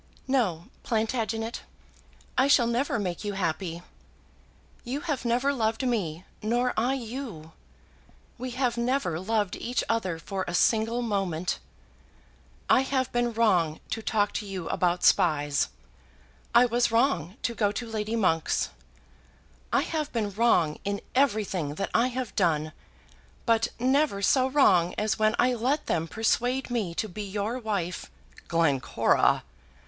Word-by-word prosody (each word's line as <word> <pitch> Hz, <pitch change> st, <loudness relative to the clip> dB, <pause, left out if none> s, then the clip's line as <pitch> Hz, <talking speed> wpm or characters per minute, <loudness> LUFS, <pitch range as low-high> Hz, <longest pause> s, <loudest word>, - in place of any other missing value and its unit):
"No, 205 Hz, -11 st, +1 dB, 0.2 s
Plantagenet; 225 Hz, 0 st, -1 dB, 0.7 s
I 260 Hz, -, +4 dB
shall 270 Hz, -4 st, +5 dB
never 235 Hz, +3 st, 0 dB
make 185 Hz, -4 st, -3 dB
you 205 Hz, -1 st, -3 dB
happy. 170 Hz, -2 st, -2 dB, 1.0 s
You 265 Hz, +4 st, -3 dB
have 285 Hz, -7 st, -3 dB
never 250 Hz, +4 st, +2 dB
loved 225 Hz, 0 st, 0 dB
me, 185 Hz, -9 st, -1 dB, 0.2 s
nor 240 Hz, +3 st, +1 dB
I 245 Hz, +5 st, +1 dB
you. 230 Hz, -, -6 dB, 0.9 s
We 255 Hz, +1 st, -4 dB
have 245 Hz, -3 st, +1 dB
never 235 Hz, -, 0 dB
loved 210 Hz, 0 st, 0 dB
each 245 Hz, +1 st, -1 dB
other 190 Hz, -7 st, -1 dB
for 190 Hz, +3 st, -4 dB
a 175 Hz, -, -2 dB
single 225 Hz, +4 st, +2 dB
moment. 190 Hz, -6 st, -1 dB, 1.1 s
I -, -, +5 dB
have 265 Hz, -1 st, -1 dB
been 240 Hz, 0 st, +1 dB
wrong 185 Hz, -9 st, +2 dB
to 225 Hz, -, -2 dB
talk 210 Hz, -2 st, +1 dB
to 210 Hz, -, -3 dB
you 185 Hz, -4 st, -5 dB
about 175 Hz, 0 st, +1 dB
spies; 145 Hz, -4 st, +3 dB, 0.9 s
I 240 Hz, +1 st, +8 dB
was 240 Hz, 0 st, +1 dB
wrong 230 Hz, -, +1 dB
to 235 Hz, -, 0 dB
go 205 Hz, -3 st, +1 dB
to 240 Hz, -, -4 dB
Lady 220 Hz, 0 st, -3 dB
Monk's; 170 Hz, -7 st, +1 dB, 1.0 s
I -, -, +3 dB
have 310 Hz, -2 st, -3 dB
been 215 Hz, -4 st, -1 dB
wrong 180 Hz, -8 st, +2 dB
in 200 Hz, 0 st, -2 dB
everything 205 Hz, -, +1 dB
that 195 Hz, -, -3 dB
I 235 Hz, +2 st, +4 dB
have 255 Hz, -3 st, -4 dB
done; 155 Hz, -5 st, +1 dB, 0.7 s
but 230 Hz, 0 st, +3 dB
never 260 Hz, -4 st, +2 dB
so 260 Hz, +4 st, +4 dB
wrong 190 Hz, -11 st, +4 dB
as 215 Hz, +1 st, 0 dB
when 215 Hz, +1 st, +3 dB
I 250 Hz, 0 st, +3 dB
let 260 Hz, +6 st, 0 dB
them 165 Hz, -1 st, -1 dB
persuade 245 Hz, +5 st, 0 dB
me 205 Hz, -8 st, -1 dB
to 215 Hz, -, -1 dB
be 210 Hz, +2 st, -7 dB
your 205 Hz, +4 st, -3 dB
wife!" 200 Hz, -7 st, -3 dB, 0.4 s
"Glencora!" 150 Hz, -7 st, +2 dB
220 Hz, 140 wpm, -27 LUFS, 180-245 Hz, 1.1 s, I